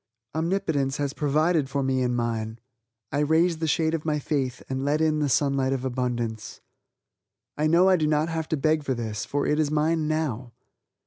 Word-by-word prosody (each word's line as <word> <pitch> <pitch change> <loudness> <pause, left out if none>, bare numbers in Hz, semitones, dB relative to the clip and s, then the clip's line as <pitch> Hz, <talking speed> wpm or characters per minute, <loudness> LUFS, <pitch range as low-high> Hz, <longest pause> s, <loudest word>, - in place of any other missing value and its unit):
Omnipotence 160 -5 0
has 140 -1 -2
provided 150 0 +1
for 140 0 -1
me 130 -1 +1
and 125 -1 0
mine, 115 -2 -2 0.5
I 145 - 0
raise 160 +3 +2
the 160 - -1
shade 160 +1 +1
of 160 -2 -2
my 155 -1 0
faith 135 -3 -2
and 130 0 -3
let 145 +2 +1
in 155 -1 +2
the 145 -1 +1
Sunlight 135 0 +2
of 130 -1 -3
Abundance. 120 -3 -3 1.0
I 155 +1 +1
know 170 +4 +5
I 190 -1 +5
do 155 -2 +1
not 150 +1 +2
have 160 -1 -3
to 160 - 0
beg 155 +2 +1
for 135 -2 -1
this, 115 -2 -4
for 145 0 -1
it 150 - +1
is 155 -2 +2
mine 155 +1 +1
now. 135 -7 -2
145 Hz, 195 wpm, -25 LUFS, 130-160 Hz, 1.0 s, know